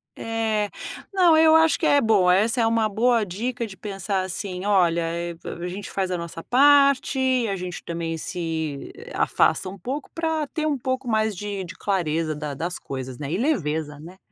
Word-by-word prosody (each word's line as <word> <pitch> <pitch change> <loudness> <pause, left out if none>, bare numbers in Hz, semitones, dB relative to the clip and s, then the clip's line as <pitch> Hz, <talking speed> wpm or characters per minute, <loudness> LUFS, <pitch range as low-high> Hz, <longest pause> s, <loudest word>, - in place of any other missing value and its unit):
É. 220 -2 -1 0.4
Não, 360 -5 +5
eu 315 0 +6
acho 320 -2 +4
que - - +1
é 285 - +5
boa, 200 -7 +4
essa 225 +5 +2
é 225 - +3
uma 225 -1 +2
boa 230 +1 +2
dica 230 +6 -3
de 195 - -10
pensar 195 0 -3
assim: 185 0 -5
"Olha, 180 -4 +3
eh, 170 +1 -3 0.3
a 175 - -4
gente 195 +3 -6
faz 190 -1 -2
a 180 - 0
nossa 170 -1 -7
parte, 265 -2 +4
a 200 - -1
gente 180 -2 -6
também 165 -1 -3
se 160 -4 -4 0.2
afasta 190 - +2
um 195 - -9
pouco 265 - -5
para 320 -2 -1
ter 310 +2 -2
um 290 - 0
pouco 260 0 -3
mais 220 -2 +1
de 200 0 -4
de 175 - -8
clareza 165 -5 -1
da 150 -1 -5
das 175 +5 -4
coisas, 130 -2 -6
né 145 0 -5
e 175 - 0
leveza, 160 - -1
né." 175 +5 -12
200 Hz, 190 wpm, -24 LUFS, 170-250 Hz, 0.4 s, eu